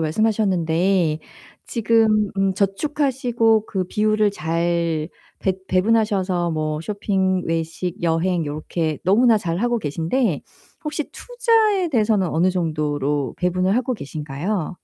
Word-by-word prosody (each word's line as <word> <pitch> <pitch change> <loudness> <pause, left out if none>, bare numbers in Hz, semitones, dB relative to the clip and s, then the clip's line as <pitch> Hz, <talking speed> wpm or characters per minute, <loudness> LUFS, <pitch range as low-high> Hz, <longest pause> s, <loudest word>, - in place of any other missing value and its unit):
말씀하셨는데 180 -2 +1 0.5
지금 220 -2 +2
음 195 -1 +1
저축하시고 235 0 +1
그 190 -3 -2
비율을 215 +2 +1
잘 165 -1 -1 0.3
배 190 -1 +1
배분하셔서 185 -3 +1
뭐 155 -1 -2
쇼핑, 190 -1 0
외식, 165 +3 -3
여행 170 0 0
요렇게 155 +1 -3
너무나 225 +4 +4
잘하고 210 +6 0
계신데 165 - 0 0.4
혹시 300 0 -3
투자에 450 -6 +1
대해서는 215 - +2
어느 170 +4 +2
정도로 150 -6 -1
배분을 185 +2 +1
하고 255 +1 0
계신가요? 155 +3 -4
185 Hz, 270 characters per minute, -21 LUFS, 165-220 Hz, 0.5 s, 너무나